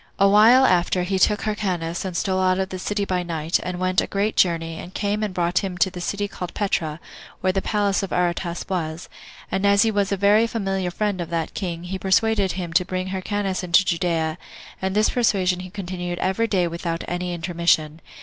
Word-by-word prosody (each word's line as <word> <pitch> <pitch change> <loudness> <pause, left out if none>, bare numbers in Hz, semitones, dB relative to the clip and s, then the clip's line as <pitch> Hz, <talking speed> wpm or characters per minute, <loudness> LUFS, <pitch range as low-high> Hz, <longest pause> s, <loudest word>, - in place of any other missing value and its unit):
A 195 - +5
while 225 +6 +7
afterward 180 -2 +2
he 190 -1 +1
took 210 +2 +3
Hyrcanus, 180 -6 -2
and 185 -3 -4
stole 190 -1 0
out 185 0 +2
of 190 0 -1
the 185 - -6
city 205 +2 -1
by 185 -2 -1
night, 165 -1 -1
and 180 -1 -4
went 185 +1 +2
a - - -4
great 205 +2 -1
journey, 165 -2 +1
and 180 - -9
came 205 +1 -1
and 210 -2 -1
brought 175 0 +1
him 190 -2 -4
to 190 +1 +2
the 180 -1 -7
city 205 +3 -2
called 180 -3 -7
Petra, 165 -6 -1 0.4
where 185 0 +1
the 195 - 0
palace 205 -2 0
of 195 - -5
Aretas 175 -1 -1
was; 165 -3 -3 0.4
and 190 - -1
as 200 +1 +5
he 225 - +2
was 205 -1 0
a 200 - +1
very 205 +4 +4
familiar 195 -5 -2
friend 200 0 -2
of 170 - -5
that 165 -2 -2
king, 170 -3 -4
he 190 +2 -5
persuaded 200 0 +2
him 175 -3 -5
to 170 - +4
bring 185 0 -3
back 185 - -6
Hyrcanus 195 0 -2
into 180 +2 +4
Judea, 165 -2 0 0.4
and 190 +1 -1
this 215 +1 +3
persuasion 190 -7 +1
he 185 0 -7
continued 180 -2 -5
every 190 +6 0
day 185 -5 +1
without 170 0 -4
any 180 0 -3
intermission. 170 -2 0
185 Hz, 215 wpm, -23 LUFS, 175-200 Hz, 0.4 s, while